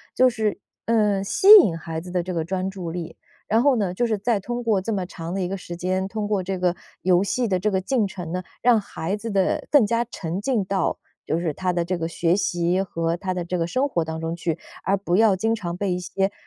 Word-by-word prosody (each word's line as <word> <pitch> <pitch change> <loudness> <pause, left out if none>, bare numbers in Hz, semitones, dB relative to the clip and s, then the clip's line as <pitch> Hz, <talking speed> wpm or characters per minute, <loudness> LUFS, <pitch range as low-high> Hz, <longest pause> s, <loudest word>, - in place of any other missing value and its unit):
就 255 0 +5
是， 220 -3 -1 0.3
嗯， 210 -4 +2
吸 285 - 0
引 185 - +4
孩 160 -1 -5
子 180 +2 -9
的 180 -1 0
这 185 +1 -4
个 165 -2 -1
专 185 +2 -2
注 185 -4 -6
力。 170 -1 -6 0.3
然 225 +2 +2
后 275 0 +4
呢， 195 -6 -1
就 240 +5 0
是 220 -2 0
再 210 +1 0
通 240 +4 -4
过 220 -4 +2
这 215 +4 -3
么 190 -2 -1
长 170 -2 -7
的 195 - -2
一 180 - -1
个 195 - -3
时 175 -1 -8
间， 185 +2 -1
通 210 +1 -3
过 205 -2 0
这 190 +1 -3
个 180 -1 +1 0.3
游 180 -1 +4
戏 240 +4 0
的 185 -3 +1
这 210 - +1
个 190 -2 0
进 230 -1 +1
程 175 -4 -7
呢， 185 - -2 0.2
让 240 -2 +5
孩 195 -1 -4
子 230 +2 -6
的 195 -3 0
更 285 -7 +5
加 230 +3 +1
沉 185 -5 -5
浸 235 -3 0
到， 195 0 0 0.3
就 160 - +1
是 165 -3 -1
他 185 +3 -1
的 175 -1 0
这 180 +1 -1
个 165 - -1
学 170 +1 +1
习 175 -1 +1
和 165 -3 -1
他 185 +1 -4
的 180 -1 -3
这 180 +1 -2
个 165 - 0
生 260 +10 +1
活 170 -10 0
当 160 0 -4
中 165 +1 -2
去， 170 -2 -2 0.3
而 195 - +2
不 185 -2 0
要 215 -2 +5
经 225 +4 0
常 175 -6 -3
被 200 0 -1
一 180 - -2
些， 195 +2 -1
190 Hz, 275 characters per minute, -23 LUFS, 175-210 Hz, 0.3 s, 就